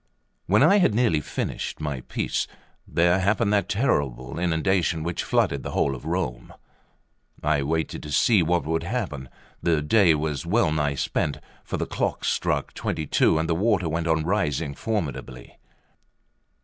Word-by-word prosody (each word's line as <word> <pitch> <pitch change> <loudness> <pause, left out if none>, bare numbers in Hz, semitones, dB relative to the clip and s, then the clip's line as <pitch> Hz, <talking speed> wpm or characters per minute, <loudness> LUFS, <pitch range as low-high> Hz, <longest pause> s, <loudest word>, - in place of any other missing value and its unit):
LV - - -47
WHEN - - +6
I 200 - +6
had 140 - +3
nearly 110 -11 +2
finished - - -4
my 75 -4 -3
piece, - - -2 0.4
there 85 +2 +3
happened 100 +1 +1
that 100 - +1
terrible 70 - -1
inundation 85 -1 +1
which 85 +1 -2
flooded 70 - +1
the - - -6
whole 70 - +1
of 65 - -9
Rome. - - -3 0.9
I 75 -1 +2
waited 80 +3 -2
to 75 - -8
see 105 +5 +4
what 85 +1 +1
would 80 +1 0
happen; 85 - -4 0.3
the 85 -3 +2
day 85 0 +4
was 75 -2 -2
well 90 0 +2
nigh 75 -2 0
spent, 70 +1 -1 0.3
for - - -4
the - - -1
clocks - - -1
struck - - -1
twenty 80 - -3
two 80 - +3
and 80 +1 0
the 85 - +1
water 95 0 +1
went 80 +1 -2
on 80 -1 +2
rising 85 -6 0
formidably. 70 - -4
80 Hz, 160 wpm, -25 LUFS, 75-95 Hz, 0.9 s, WHEN